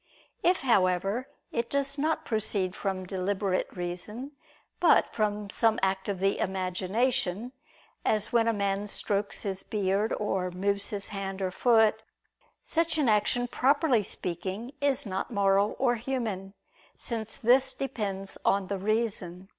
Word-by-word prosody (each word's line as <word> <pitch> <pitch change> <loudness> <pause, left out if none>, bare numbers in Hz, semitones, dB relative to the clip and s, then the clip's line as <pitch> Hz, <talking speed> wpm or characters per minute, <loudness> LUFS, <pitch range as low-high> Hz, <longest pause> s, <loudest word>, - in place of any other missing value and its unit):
If, 360 +1 +3
however, 200 0 +2 0.2
it 235 0 -1
does 280 0 0
not 315 +3 0
proceed 205 -4 0
from 190 -2 -3
deliberate 190 +1 -1
reason, 185 +10 -4 0.5
but - - +4
from 210 -2 -1
some 225 -1 +3
act 190 +1 0
of 200 - -1
the 195 +2 +1
imagination, 195 +4 -1 0.5
as 215 +1 0
when 230 -1 +4
a - - +4
man 200 -1 -1
strokes 205 0 -1
his 195 -2 -2
beard, 205 +1 0
or 190 -3 -1
moves 200 +2 -1
his 200 -2 -4
hand 195 -1 -4
or 190 -1 -1
foot; 220 +1 +4 0.6
such 330 -1 0
an 285 -6 +3
action, 220 +4 +2
properly 270 -1 +3
speaking, 190 +5 -4
is 280 -3 +2
not 190 -2 -3
moral 200 -1 +2
or 245 -2 +2
human; 220 -6 -3 0.4
since 220 -2 -4
this 255 +3 +4
depends 205 -8 -3
on 195 -1 +2
the 200 -1 -2
reason. 195 -3 -2
205 Hz, 140 wpm, -28 LUFS, 190-235 Hz, 0.6 s, but